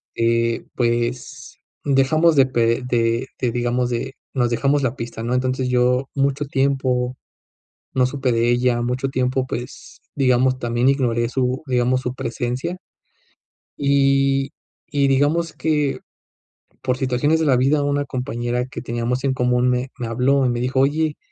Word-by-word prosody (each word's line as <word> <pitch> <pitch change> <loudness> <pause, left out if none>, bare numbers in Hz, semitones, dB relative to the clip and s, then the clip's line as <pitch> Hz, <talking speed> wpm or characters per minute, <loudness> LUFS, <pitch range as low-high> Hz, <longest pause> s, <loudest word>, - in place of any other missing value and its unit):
este, 115 0 +1
pues, 120 0 -2 0.3
dejamos 150 +4 +3
de 135 - +7
pe 115 -1 +1
de 115 +1 +1
de, 125 -2 0
digamos 120 +1 0
de 125 +2 -3 0.2
nos 120 -3 +1
dejamos 140 +4 +1
la 130 -2 -1
pista, 115 -3 -6
¿no?, 120 +2 -2
entonces, 130 0 0
yo 125 +1 +2
mucho 140 +1 0
tiempo 130 -2 0 0.8
no 130 - +3
supe 130 0 -1
de 115 +1 +2
ella 120 0 +2
mucho 125 +2 -1
tiempo, 130 0 0
pues, 120 +1 -7
digamos 130 -1 +2
también 120 +2 +1
ignoré 120 -4 0
su, 130 0 -1
digamos 125 0 +1
su 125 - -2
presencia. 125 +7 -3 1.1
Y 135 -1 +2 0.4
y 140 -2 +2
digamos 145 +5 +1
que, 150 -3 0 0.8
por 125 0 0
situaciones 135 +4 +1
de 160 - +1
la 130 -3 +4
vida, 140 +4 +2
una 145 0 0
compañera 125 -2 -2
que - - -7
teníamos 120 +2 -2
en 135 -1 +1
común 125 0 +1
me 125 +1 0
me 120 - -4
habló 130 +4 +2
y - - +2
me 120 0 -1
dijo: 130 +2 0
"Oye, 150 +2 +1
130 Hz, 150 wpm, -21 LUFS, 120-135 Hz, 1.1 s, de